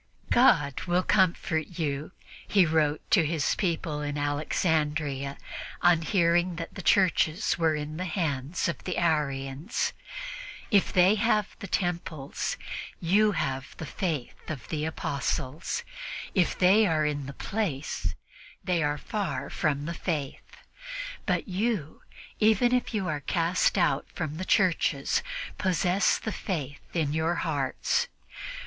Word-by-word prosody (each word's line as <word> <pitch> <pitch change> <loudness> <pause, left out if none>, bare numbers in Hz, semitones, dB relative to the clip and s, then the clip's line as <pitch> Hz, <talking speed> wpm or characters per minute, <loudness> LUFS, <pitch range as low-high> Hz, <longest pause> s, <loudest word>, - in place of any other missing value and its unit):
"God 145 - +4
will 175 +1 +2
comfort 170 -4 +1
you," 150 -1 -2 0.4
he 195 -3 +5
wrote 155 -2 +2
to 180 - +6
his 155 -1 +1
people 165 -5 -1
in 145 0 -3
Alexandria 145 -1 0 0.5
on 175 -2 +5
hearing 175 +1 +2
that 165 0 -6
the 190 - -6
churches 175 -4 +3
were 160 -2 +3
in 150 +1 -4
the 185 - -2
hands 155 -3 -1
of 170 - -3
the 180 - -3
Arians. 150 - 0 0.8
"If 200 -3 +4
they 185 +2 +6
have 215 -3 +2
the 200 - -6
temples, 170 -6 -2 0.4
you 205 +5 +3
have 135 -6 -3
the 160 - -5
Faith 155 -5 -4
of 150 -6 -5
the 155 -1 -1
Apostles. 150 - -2 0.5
If 180 -4 +2
they 200 +4 +5
are 155 -3 +2
in 145 -2 -2
the - - -5
place, 165 -6 -2 0.5
they 180 -3 +1
are 150 -1 +1
far 205 +3 -3
from 145 -1 0
the 170 - -3
Faith; 150 -6 -4 0.7
but - - +1
you, 195 -5 -1 0.4
even 220 +3 +4
if 250 -1 +1
you 195 -3 0
are 150 -2 -1
cast 170 +6 +1
out 175 - +2
from 155 -2 -3
the 185 - -4
churches, 165 -8 +2 0.4
possess 185 +1 +2
the 220 - -4
Faith 150 -10 -4
in 155 -4 +1
your 160 +2 +1
hearts. 155 - 0
165 Hz, 135 wpm, -28 LUFS, 150-185 Hz, 0.8 s, to